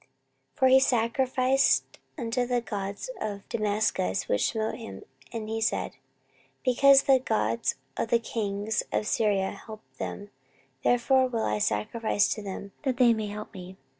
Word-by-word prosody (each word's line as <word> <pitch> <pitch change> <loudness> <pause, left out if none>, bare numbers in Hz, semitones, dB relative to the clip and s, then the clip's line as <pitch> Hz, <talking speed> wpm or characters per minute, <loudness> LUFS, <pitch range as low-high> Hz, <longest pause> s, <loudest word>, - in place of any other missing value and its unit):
14:028:023 - - -34
For 260 - +4
he 260 +1 +7
sacrificed 255 +2 +2 0.2
unto 245 -1 -1
the 245 -1 +1
gods 200 - -5
of 200 -2 -5
Damascus, 210 - 0
which 105 - +1
smote 220 0 -2
him: 95 -1 -9 0.3
and 220 -2 -5
he 225 +1 -3
said, 220 - -1 0.7
Because 275 +2 +6
the 270 -1 +5
gods 115 - 0 0.2
of - - -1
the 235 - +4
kings 215 -2 -2
of - - 0
Syria 205 -3 +1
help 215 +2 -10 0.2
them, 205 0 -6 0.5
therefore 260 +2 +3
will 230 -3 -2
I 105 0 0
sacrifice 205 - +1
to 215 - -2
them, 200 0 -7
that 265 -4 -1
they 245 -2 +6
may 215 -1 -3
help 210 +1 -7
me. 185 0 -10
220 Hz, 155 wpm, -27 LUFS, 200-250 Hz, 0.7 s, he